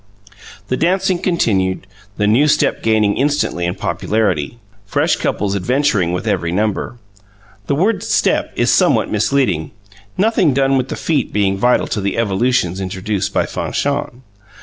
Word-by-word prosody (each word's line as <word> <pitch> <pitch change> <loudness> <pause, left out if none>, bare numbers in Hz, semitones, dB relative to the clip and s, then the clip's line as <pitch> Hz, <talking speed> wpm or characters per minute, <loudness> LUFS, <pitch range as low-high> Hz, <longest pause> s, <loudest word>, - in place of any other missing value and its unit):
The 130 - 0
dancing 185 +2 +1
continued, 95 - 0 0.3
the 105 - +1
new 120 +8 +4
step 150 0 +1
gaining 110 -2 +2
instantly 135 -11 0
in 90 - -3
popularity, 105 -4 -1 0.3
fresh 100 - +1
couples 100 -1 -1
adventuring 105 -3 +1
with 90 - -3
every 85 -1 -1
number. 105 +5 -2 0.7
The 140 - +1
word 200 +8 +1
"step" - - +1
is - - +2
somewhat - - +2
misleading, 110 - 0 0.5
nothing 190 - +2
done 135 0 +2
with 130 -1 0
the - - -3
feet 150 -6 -1
being 100 -2 +1
vital 125 +6 +2
to 105 - -3
the 100 0 -2
evolutions 100 -4 0
introduced 100 +2 -3
by - - +1
Fanchon. 140 -3 -3
110 Hz, 145 wpm, -17 LUFS, 95-140 Hz, 0.7 s, new